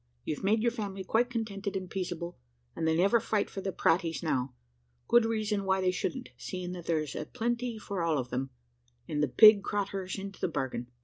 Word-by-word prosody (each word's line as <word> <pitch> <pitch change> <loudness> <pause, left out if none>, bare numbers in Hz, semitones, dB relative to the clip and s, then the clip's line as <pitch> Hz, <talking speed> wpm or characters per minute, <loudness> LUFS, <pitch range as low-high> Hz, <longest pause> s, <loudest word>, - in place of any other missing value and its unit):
You've 150 - -3
made 215 +3 +3
your 235 - +3
family 200 -4 -4
quite 230 +6 +2
contented 205 -4 -3
and 190 -1 -3
peaceable 175 -2 -4 0.4
and 160 - -1
they 160 0 +3
never 200 +7 +4
fight 215 -2 -1
for 195 - -5
the 195 - -2
praties 165 -1 +1
now 130 -5 -1 0.5
good 240 -1 +5
reason 215 -2 0
why 190 0 +2
they 185 -1 +2
shouldn't, 250 +7 -3
seeing 180 -2 -5
that 175 -2 -7
there's 155 -3 0
a - - -4
plenty 240 0 -2
for 200 -3 -4
all 165 -2 +2
of 125 -2 -3
them, 135 +2 -2 0.6
and 150 -1 -1
the 150 - +3
pig 215 - +8
craturs 195 -2 -2
into 195 0 -7
the - - +2
bargain. 130 -6 -3
195 Hz, 200 wpm, -30 LUFS, 165-215 Hz, 0.6 s, pig